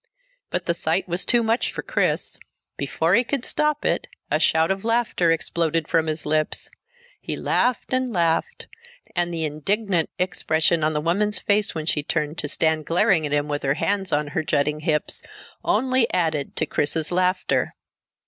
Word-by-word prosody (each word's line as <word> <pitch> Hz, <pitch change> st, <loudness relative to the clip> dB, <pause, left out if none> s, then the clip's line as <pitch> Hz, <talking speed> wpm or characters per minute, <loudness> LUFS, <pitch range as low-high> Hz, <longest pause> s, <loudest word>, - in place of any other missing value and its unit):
But -, -, -2 dB
the -, -, +1 dB
sight -, -, -1 dB
was 175 Hz, +1 st, -1 dB
too 240 Hz, -1 st, +3 dB
much 225 Hz, +2 st, +1 dB
for -, -, -5 dB
Chris. -, -, -1 dB, 0.4 s
Before 160 Hz, +5 st, 0 dB
he 235 Hz, -, +5 dB
could 260 Hz, 0 st, -3 dB
stop 300 Hz, -1 st, 0 dB
it -, -, 0 dB, 0.2 s
a -, -, +3 dB
shout 160 Hz, +2 st, +3 dB
of 195 Hz, 0 st, -2 dB
laughter 230 Hz, -6 st, +1 dB
exploded 165 Hz, -1 st, 0 dB
from 160 Hz, -1 st, +2 dB
his 155 Hz, 0 st, -3 dB
lips. 155 Hz, 0 st, -1 dB, 0.5 s
He -, -, -3 dB
laughed 250 Hz, +1 st, 0 dB
and 255 Hz, -1 st, +1 dB
laughed, 170 Hz, -4 st, 0 dB, 0.5 s
and 175 Hz, -1 st, 0 dB
the 165 Hz, -2 st, -1 dB
indignant 175 Hz, +4 st, 0 dB
expression 165 Hz, -2 st, +1 dB
on 155 Hz, +1 st, +2 dB
the 150 Hz, -, 0 dB
woman's 205 Hz, +6 st, +2 dB
face 205 Hz, -2 st, +1 dB
when 160 Hz, -1 st, -3 dB
she 155 Hz, -2 st, 0 dB
turned, 150 Hz, +1 st, -2 dB
to 150 Hz, -, -2 dB
stand 160 Hz, 0 st, 0 dB
glaring 175 Hz, -2 st, +3 dB
at -, -, -7 dB
him 145 Hz, 0 st, +1 dB
with 145 Hz, -1 st, -2 dB
her 135 Hz, 0 st, +1 dB
hands 195 Hz, +2 st, -1 dB
on 145 Hz, 0 st, +1 dB
her 160 Hz, -, -1 dB
jutting 150 Hz, -1 st, 0 dB
hips, 150 Hz, -1 st, 0 dB, 0.4 s
only 255 Hz, -2 st, +2 dB
added 160 Hz, -5 st, 0 dB
to -, -, +1 dB
Chris's 155 Hz, +2 st, -1 dB
laughter. 185 Hz, +1 st, +1 dB
165 Hz, 175 wpm, -23 LUFS, 155-200 Hz, 0.5 s, he